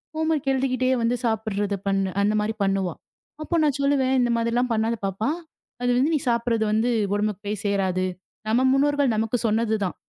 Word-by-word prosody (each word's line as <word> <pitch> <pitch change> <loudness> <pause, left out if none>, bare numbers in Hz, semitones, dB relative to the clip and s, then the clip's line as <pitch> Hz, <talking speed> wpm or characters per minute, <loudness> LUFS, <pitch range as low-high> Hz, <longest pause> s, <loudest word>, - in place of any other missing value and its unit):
Homework 315 -3 0
எழுதிக்கிட்டே 255 -1 0
வந்து 230 +2 +1
சாப்பிடுறதை 205 -3 -1
பண்ணு 195 -1 +1
அந்த 210 +1 +2
மாதிரி 215 +1 -2
பண்ணுவா. 195 -3 0 0.5
அப்போ 340 - -2
நான் 290 -2 +1
சொல்லுவேன். 270 -2 +2
"இந்த 240 -1 +1
மாதிரி 230 0 0
எல்லாம் 245 0 +1
பண்ணாத 225 +1 0
பாப்பா. 195 +6 -1 0.5
அது 245 - +1
வந்து 275 +6 +2
நீ - - +1
சாப்பிடுறது 235 -1 +1
வந்து 220 +3 +2 0.2
உடம்புக்குப் 205 0 -2
போய்சேராது." 200 -3 -1 0.4
நம்ம 245 +4 +3
முன்னோர்கள் 285 -2 +2
நமக்குச் 225 +2 -1
சொன்னதுதான். 215 -3 0
230 Hz, 160 wpm, -24 LUFS, 205-255 Hz, 0.5 s, நம்ம